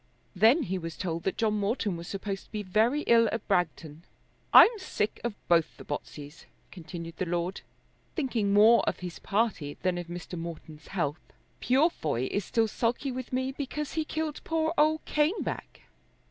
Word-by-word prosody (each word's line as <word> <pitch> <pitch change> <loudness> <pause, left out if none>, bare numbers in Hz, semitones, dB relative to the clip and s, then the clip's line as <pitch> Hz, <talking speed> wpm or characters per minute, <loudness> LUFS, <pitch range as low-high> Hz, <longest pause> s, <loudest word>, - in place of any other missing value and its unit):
Then 230 - +5
he 190 +1 -2
was 165 -2 -6
told 170 -3 -3
that 190 - -1
John 215 -2 +1
Morton 205 -2 -1
was 170 +1 -8
supposed 195 0 -4
to - - -29
be 210 -1 -3
very 220 +9 +2
ill 230 -4 +4
at 225 - -4
Bragton. 165 -5 -1 0.5
"I'm 450 -1 +8
sick 215 - -2
of 235 -3 -2
both 170 -2 +2
the - - -10
Botseys," 145 +1 -7 0.3
continued 170 -2 -8
the 185 - -2
lord, 175 +2 -2 0.5
thinking 245 - 0
more 215 +3 +7
of - - -6
his 180 -1 -6
party 200 -9 -1
than 180 -1 +1
of 175 - -6
Mr. 175 0 -7
Morton's 160 -2 -8
health. 155 -4 -2 0.4
"Purefoy 245 - +1
is 200 - -1
still 225 -1 +1
sulky 240 +5 -1
with 255 -1 -6
me 260 +1 -1
because 285 +2 -4
he 320 - 0
killed 315 -1 -3
poor 320 0 0
old 310 0 +2
Caneback." 305 +7 -1
205 Hz, 170 wpm, -28 LUFS, 170-255 Hz, 0.5 s, I'm